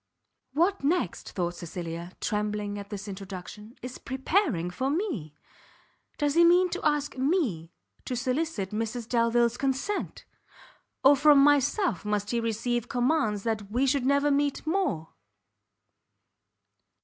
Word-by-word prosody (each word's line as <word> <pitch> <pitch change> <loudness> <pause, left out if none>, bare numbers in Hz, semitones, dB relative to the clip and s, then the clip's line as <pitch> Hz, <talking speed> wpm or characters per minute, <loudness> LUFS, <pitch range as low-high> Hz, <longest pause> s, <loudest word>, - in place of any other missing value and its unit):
What 345 +4 +1
next, 295 - -1
thought 175 -1 -1
Cecilia, 170 0 -6
trembling 210 -1 -2
at 200 0 -9
this 205 0 -6
introduction, 195 +3 -8
is 250 0 -7
preparing 265 - 0
for 260 +9 -2
me! 280 - -2 0.8
does 290 -1 +1
he 340 +2 +5
mean 355 +1 +5
to - - -4
ask 295 -3 0
me 260 - 0 0.3
to 255 - -3
solicit 255 - -2
Mrs 225 +2 -3
Delvile's 235 0 +2
consent! 275 +10 -2 0.8
or 275 +2 +8
from 295 +1 +6
myself 290 - +2
must 210 -1 -1
he 240 - +1
receive 230 +1 -1
commands 245 -5 +1
that 215 -3 -2
we 245 +5 +1
should 265 -1 +1
never 280 +1 +3
meet 285 +1 0
more! 315 - -1
245 Hz, 125 wpm, -28 LUFS, 205-290 Hz, 0.8 s, or